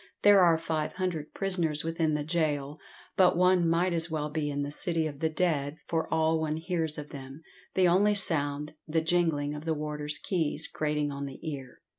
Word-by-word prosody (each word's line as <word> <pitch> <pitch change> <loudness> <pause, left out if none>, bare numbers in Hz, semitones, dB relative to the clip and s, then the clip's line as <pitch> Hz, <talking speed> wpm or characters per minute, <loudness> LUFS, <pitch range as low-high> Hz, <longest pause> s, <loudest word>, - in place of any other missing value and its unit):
There 205 -1 +7
are 170 -2 +5
five 160 -1 -2
hundred 180 -5 -3
prisoners 170 -6 0
within 165 -1 0
the 150 - -1
gaol, 150 -3 -1 0.4
but 185 -2 +4
one 180 -1 +4
might 175 +2 +2
as 165 0 -1
well 150 -2 -3
be 150 -1 -1
in 145 0 -2
the 145 - -4
City 165 +1 0
of 145 -3 -5
the 160 - +1
Dead 155 -3 -1
for 165 -1 -2
all 160 0 +2
one 155 -1 -1
hears 160 -2 -2
of 150 0 -7
them, 135 +2 -10 0.3
the 185 -1 +4
only 200 +4 +4
sound, 150 -6 +2
the 160 +1 +1
jingling 160 -3 +1
of 150 0 -7
the 160 -1 0
warders' 150 0 -3
keys, 160 -2 -2
grating 150 -1 -1
on 140 0 -5
the 135 - -9
ear. 135 -4 -7
160 Hz, 195 wpm, -29 LUFS, 150-170 Hz, 0.4 s, There